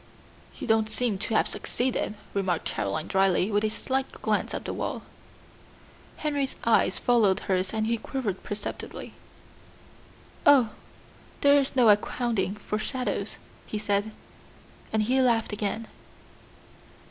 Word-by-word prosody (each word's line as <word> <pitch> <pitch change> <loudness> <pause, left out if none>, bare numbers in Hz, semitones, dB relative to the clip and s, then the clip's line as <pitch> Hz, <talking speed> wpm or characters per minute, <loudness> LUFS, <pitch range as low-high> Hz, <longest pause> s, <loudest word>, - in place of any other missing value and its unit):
"You - - -5
don't 220 -1 +2
seem 220 -4 -1
to 225 - -1
have - - +4
succeeded," 245 -3 -2 0.2
remarked 185 -4 0
Caroline 105 +10 -2
dryly, 190 +1 +2
with 205 +1 +2
a 215 - +2
slight 265 +4 -2
glance - - -1
at - - -4
the - - -3
wall. - - -3 1.1
Henry's 285 -3 -1
eyes 225 -4 +3
followed 225 -6 +3
hers 185 -1 0
and 220 -1 0
he 230 +1 +1
quivered 220 -5 -3
perceptibly. 205 0 -6 1.3
"Oh, 260 -6 +6 0.7
there 285 0 +6
is 275 - -3
no 250 -3 +5
accounting 210 -2 +1
for 210 0 -3
shadows," 255 +3 -2 0.3
he 215 - -3
said, 205 0 0 0.8
and 220 -1 +2
he 260 +4 +2
laughed 230 -4 +2
again. 210 +2 -2
220 Hz, 130 wpm, -27 LUFS, 200-250 Hz, 1.3 s, Oh